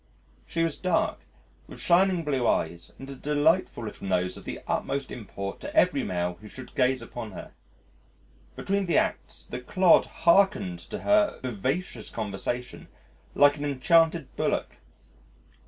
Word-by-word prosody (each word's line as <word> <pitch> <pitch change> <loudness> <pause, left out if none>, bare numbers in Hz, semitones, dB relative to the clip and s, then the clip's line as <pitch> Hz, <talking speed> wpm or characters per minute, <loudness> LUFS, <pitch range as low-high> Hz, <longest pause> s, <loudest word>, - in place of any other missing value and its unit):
She 165 - -1
was 165 -3 -1
dark, 180 -3 0 0.5
with - - -11
shining 180 0 +3
blue 135 -5 0
eyes, 85 +1 -1
and 135 - -9
a 135 - -7
delightful 150 +1 +1
little 105 -2 -7
nose 90 -1 0
of - - -12
the - - -5
utmost 140 -1 -2
import 100 -4 -6
to - - -8
every - - +4
male 90 -1 -2
who 110 - -11
should 130 +4 -11
gaze 130 0 +1
upon 115 -4 -7
her. - - -9 1.0
Between 195 -1 -1
the 170 - +2
acts, - - -2
the 125 - -6
clod 185 +7 +4 0.2
hearkened 170 - +4
to - - -5
her 310 -1 +3
vivacious 125 - -3
conversation 110 +3 -4 0.5
like 145 +1 +5
an 145 - -5
enchanted 160 +1 +2
bullock. - - -1
135 Hz, 145 wpm, -27 LUFS, 110-170 Hz, 1.0 s, like